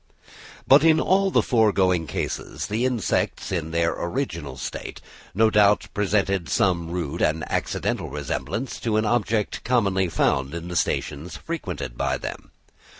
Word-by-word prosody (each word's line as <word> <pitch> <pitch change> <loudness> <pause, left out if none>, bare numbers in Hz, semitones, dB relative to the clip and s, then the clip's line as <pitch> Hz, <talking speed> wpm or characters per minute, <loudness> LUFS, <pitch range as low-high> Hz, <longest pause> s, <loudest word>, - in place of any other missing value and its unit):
But 140 +3 +7
in 160 -1 +5
all 195 +1 +3
the - - +3
foregoing 95 - +2
cases - - -4
the 110 +4 -1
insects 125 -5 -1
in 85 -4 -2
their 85 0 +1
original 85 - -4
state - - -6 0.4
no 110 +1 +4
doubt 105 -1 +4
presented 100 -4 0
some 85 +2 +1
rude 85 -2 -3
and 80 +1 +1
accidental - - -2
resemblance 75 - -4
to 110 -2 0
an 110 - +1
object 110 -1 0
commonly 100 -7 +1
found 70 -2 0
in 85 +1 -6
the 90 - -5
stations 80 0 -2
frequented 90 - -5
by - - 0
them. - - -7
95 Hz, 145 wpm, -24 LUFS, 85-115 Hz, 0.4 s, But